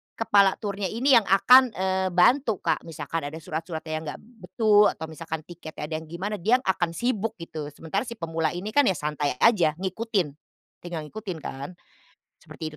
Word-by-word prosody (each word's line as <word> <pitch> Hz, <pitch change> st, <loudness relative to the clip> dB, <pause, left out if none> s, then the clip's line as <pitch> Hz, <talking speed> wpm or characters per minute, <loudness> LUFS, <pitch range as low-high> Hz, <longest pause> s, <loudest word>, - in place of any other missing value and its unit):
kepala 200 Hz, -4 st, +4 dB
turnya 200 Hz, -2 st, -3 dB
ini 255 Hz, +4 st, +4 dB
yang 230 Hz, -, +3 dB
akan, 250 Hz, +7 st, +6 dB
eee, 190 Hz, 0 st, 0 dB
bantu 220 Hz, +5 st, +3 dB
Kak. -, -, 0 dB
Misalkan 165 Hz, 0 st, -4 dB
ada 155 Hz, +2 st, -7 dB
surat-suratnya 160 Hz, 0 st, -5 dB
yang -, -, -10 dB
enggak 150 Hz, -, -6 dB
betul 220 Hz, -2 st, +2 dB
atau 160 Hz, -, -7 dB
misalkan 160 Hz, 0 st, -6 dB
tiketnya 155 Hz, -3 st, -8 dB
ada 155 Hz, -, -4 dB
yang 160 Hz, -, -13 dB
gimana, 195 Hz, +5 st, -3 dB
dia 225 Hz, +8 st, +3 dB
yang -, -, -19 dB
akan 175 Hz, -3 st, +1 dB
sibuk, 225 Hz, -2 st, -1 dB
gitu. 155 Hz, -3 st, -6 dB
Sementara 165 Hz, +8 st, -3 dB
si 235 Hz, -, -6 dB
pemula 165 Hz, -1 st, -1 dB
ini 180 Hz, +4 st, -5 dB
kan 290 Hz, -, +6 dB
ya 190 Hz, -, +4 dB
santai 150 Hz, -1 st, -1 dB
aja 190 Hz, -9 st, +4 dB
ngikutin, 195 Hz, 0 st, -1 dB, 0.6 s
tinggal 175 Hz, -2 st, -5 dB
ngikutin 195 Hz, -2 st, -6 dB
kan, 140 Hz, +4 st, -6 dB, 0.7 s
seperti 155 Hz, -2 st, -8 dB
185 Hz, 180 wpm, -25 LUFS, 160-215 Hz, 0.7 s, akan